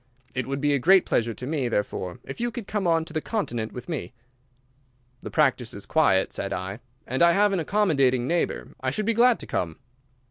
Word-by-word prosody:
It 130 -1 -2
would 135 +1 -2
be 145 0 +2
a 140 - +2
great 190 +7 +5
pleasure 115 -1 0
to 125 - -6
me, 140 -3 -1
therefore, 95 -5 -2
if - - -7
you 240 - +1
could 235 -2 -6
come 200 -2 -1
on 165 -1 +2
to 160 - -11
the 155 - -1
Continent 120 - -3
with 125 - -8
me." 155 -8 -4 1.1
"The - - -6
practice - - +1
is - - -8
quiet," 95 0 +2
said 100 - -3
I, 95 +2 -4 0.3
"and 130 +2 -2
I 170 0 +6
have 205 +1 +3
an 190 - +1
accommodating 140 -9 +2
neighbour. 170 +1 -1
I 130 - 0
should 180 +11 -2
be 230 - +2
glad 240 +1 +5
to - - -7
come." 80 -3 -2
145 Hz, 215 wpm, -25 LUFS, 120-195 Hz, 1.1 s, I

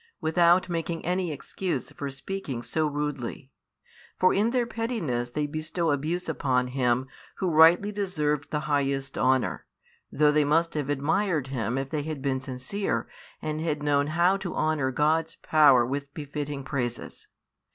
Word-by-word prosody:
without 170 +3 +4
making 165 -1 -3
any 180 -1 0
excuse 175 +5 -4
for 140 - -5
speaking 140 -3 -5
so 155 +3 0
rudely. 145 -3 -4 0.7
For 185 - +4
in 210 +3 +2
their 245 0 +1
pettiness 220 - -2
they 150 +4 -1
bestow 155 +2 -2
abuse 155 +5 -1
upon 130 -5 0
Him 125 -1 +1 0.3
Who 185 -3 -1
rightly 165 +6 +6
deserved 150 -8 -1
the 150 -1 -1
highest 140 -2 -1
honour, 130 0 +1 0.4
though 150 0 +4
they 150 0 +3
must 165 +3 +2
have 145 -2 -2
admired 150 +1 0
Him 125 -1 -2
if 135 0 -3
they 150 - -1
had 155 -1 -4
been 130 -2 0
sincere 130 +10 -3 0.4
and 155 0 -2
had 150 -2 -2
known 145 -1 +2
how 170 +5 +3
to 190 -3 -5
honour 155 -4 +1
God's 155 +4 +1
power 145 -6 +6
with 140 +2 -4
befitting 145 -2 -5
praises. 125 -4 -4
150 Hz, 150 wpm, -27 LUFS, 135-170 Hz, 0.7 s, rightly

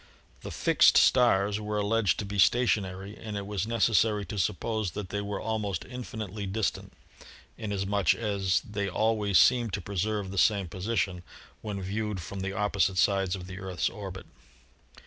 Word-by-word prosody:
The - - -7
"fixed" - - +4
stars 105 -5 +4
were 105 0 -3
alleged 105 -2 +1
to 105 - -3
be 100 0 -4
stationary, 100 -3 +2
and 110 -2 -6
it 100 - -4
was 105 0 -3
necessary 110 -2 +2
to 105 - -5
suppose 105 0 -1
that 100 -3 -5
they 105 +1 -2
were 100 -1 -4
almost 105 -3 -3
infinitely 110 -5 -6
distant, 100 +2 -2 0.7
inas 100 -3 -3
much 100 -3 +2
as 100 -4 0
they 100 -1 -3
always 105 -1 +1
seemed 120 -5 +4
to 100 - -1
preserve 100 +1 -2
the 100 - -1
same 100 -4 +3
position 95 0 -2 0.4
when 100 -3 -5
viewed 105 +1 -3
from 95 +3 -7
the 95 +1 -3
opposite 100 -1 +1
sides 95 +2 +2
of 90 -2 -8
the 95 +1 -8
Earth's 95 -2 -2
orbit. 95 -3 -8
100 Hz, 165 wpm, -28 LUFS, 95-110 Hz, 0.7 s, fixed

